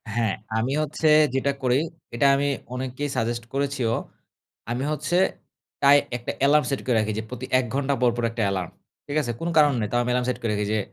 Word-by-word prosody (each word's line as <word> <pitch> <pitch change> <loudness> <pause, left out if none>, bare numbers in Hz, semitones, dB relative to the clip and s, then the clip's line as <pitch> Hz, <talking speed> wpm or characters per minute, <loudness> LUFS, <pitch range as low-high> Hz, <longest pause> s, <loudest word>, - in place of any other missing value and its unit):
হ্যাঁ। 115 -4 +1 0.2
আমি 120 +4 0
হচ্ছে 155 +1 -1 0.3
যেটা 135 +1 +1
করি, 125 +1 +3 0.4
এটা 120 - +2
আমি 140 +1 0 0.3
অনেককেই 130 +3 -3
সাজেস্ট 115 +1 -1
করেছিও। 135 -4 0 0.8
আমি 125 +2 -1
হচ্ছে, 155 +4 -1 0.7
তাই 140 +1 +8 0.2
একটা 120 - -4
এলার্ম 150 +1 +4
সেট 135 - -2
করে 125 - +1
রাখি 110 0 0
যে, - - -4
প্রতি 125 0 -6
১ 130 - -1
ঘন্টা 140 0 +1
পরপর 120 -1 +2
একটা 115 -1 -2
এলার্ম। 90 -3 -3 0.4
ঠিক 145 - -4
আছে? 120 -5 -3
কোনো 170 +1 -2
কারণ 150 -1 +6
নেই। 105 - -1
তাও 120 - +2
আমি 120 - -3
অ্যালার্ম 125 0 +1
সেট 125 -1 -2
করে 115 - 0
রাখি 105 0 -1
যে, 110 - +1
125 Hz, 205 wpm, -24 LUFS, 120-140 Hz, 0.8 s, তাই